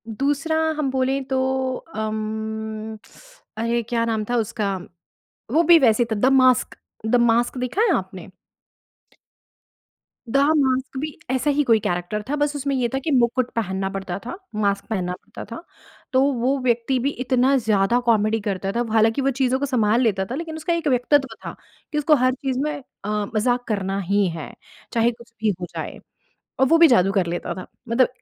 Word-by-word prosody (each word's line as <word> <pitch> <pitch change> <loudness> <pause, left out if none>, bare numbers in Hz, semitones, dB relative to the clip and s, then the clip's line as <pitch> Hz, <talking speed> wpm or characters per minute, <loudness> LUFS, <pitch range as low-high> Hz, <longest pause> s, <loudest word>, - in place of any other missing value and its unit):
दूसरा 280 +7 -1 0.2
हम 295 -3 0
बोले 265 +1 +1
तो 265 - 0 0.6
अम, 220 0 -4 0.6
अरे! 230 +1 0
क्या 230 -1 +1
नाम 220 -2 -1
था 245 - +1
उसका। 215 -3 -1 0.8
वो 320 +4 +5
भी 340 0 +7
वैसे 240 -4 +4
था - - +2
द 250 - +4
मास्क 255 -2 +4 0.3
द 235 +3 +3
मास्क 235 +2 +2
देखा 250 - 0
है 470 - +3
आपने? - - -6 2.0
द 250 - +2 0.2
मास्क 265 -1 0
भी 305 +1 -5
ऐसा 260 +3 +1
ही 290 +1 +2
कोई 230 -5 +4
कैरेक्टर 175 +2 -2
था, 295 - 0
बस 290 0 0
उसमें 280 -1 -1
ये 250 -2 +1
था 270 - 0
कि 320 - 0
मुकुट 250 -1 +2
पहनना 190 -3 -1
पड़ता 195 -2 -4
था, 250 - -5 0.2
मास्क 200 -1 0
पहनना 180 -5 -1
पड़ता 180 - -10
था। - - -9 0.5
तो 260 - +4
वो 255 +3 +1
व्यक्ति 240 +1 +1
भी 265 +3 0
इतना 255 +2 +3
ज़्यादा 220 -1 +2
कॉमेडी 220 -1 +2
करता 195 -1 -2
था। 235 +3 0
हालाँकि 225 +3 +3
वो 275 - +2
चीज़ों 260 0 +2
को 280 - 0
सँभाल 235 -3 +2
लेता 200 -6 +1
था - - -2
लेकिन 320 +1 -5
उसका 320 +2 -1
एक 335 -2 -1
व्यक्तित्व 270 +1 +2
था - - -6 0.4
कि 300 - -2
उसको 300 +1 +4
हर 255 -1 +2
चीज़ 265 0 -3
में 300 - -1 0.3
अ, - - -3 0.3
मज़ाक 245 +3 +1
करना 195 -2 -1
ही 200 +1 +1
है, 155 - -7 0.4
चाहे 235 +1 +3
कुछ 235 0 -16
भी 220 - +2
हो 175 - -4
जाए - - -5 0.6
और 265 - +5
वो 330 - +5
भी 335 0 +8
जादू 195 - +4
कर 195 -3 +1
लेता 175 0 -3
था। 185 - -8 0.2
मतलब 240 +2 +4
240 Hz, 185 wpm, -22 LUFS, 215-270 Hz, 2.0 s, भी